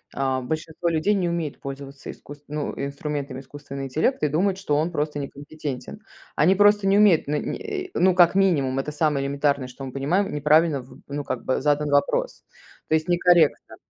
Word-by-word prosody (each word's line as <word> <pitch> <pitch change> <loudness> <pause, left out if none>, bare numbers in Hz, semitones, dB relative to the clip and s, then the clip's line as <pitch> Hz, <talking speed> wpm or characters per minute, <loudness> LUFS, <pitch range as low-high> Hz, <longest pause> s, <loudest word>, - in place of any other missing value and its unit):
А, 130 -1 0
большинство 160 +5 -4
людей 165 +5 +1
не 185 -4 0
умеет 170 -4 -3
пользоваться 140 0 -8
иску 145 - -10
ну 150 0 -3
инструментами 140 -1 -4
искусственного 140 0 -8
интеллекта 155 - 0
и - - +1
думают, 185 +6 +1
что 190 -7 -1
он 155 +4 0
просто 150 -2 -2
некомпетентен. 145 +5 -7 0.3
Они 180 +5 +4
просто 205 0 +4
не 195 +1 +4
умеют, 205 -6 +5
ну 150 - -1
не, - - -3 0.3
э, - - -11
ну 185 0 +3
как 175 -2 +6
минимум, 145 -9 +2
это 145 +2 -3
самое 150 -3 0
элементарное, 140 -1 0
что 125 +2 -10
мы 130 - -7
понимаем, 155 +10 0
неправильно, 150 0 +3
в 125 - -16
ну, 145 +1 -4
как 125 - -4
бы 130 - -1
задан 150 0 +1
вопрос. - - 0 0.4
То 160 - +2
есть, 160 +2 -1
некорректно. 175 -3 +3
150 Hz, 185 wpm, -24 LUFS, 140-175 Hz, 0.4 s, как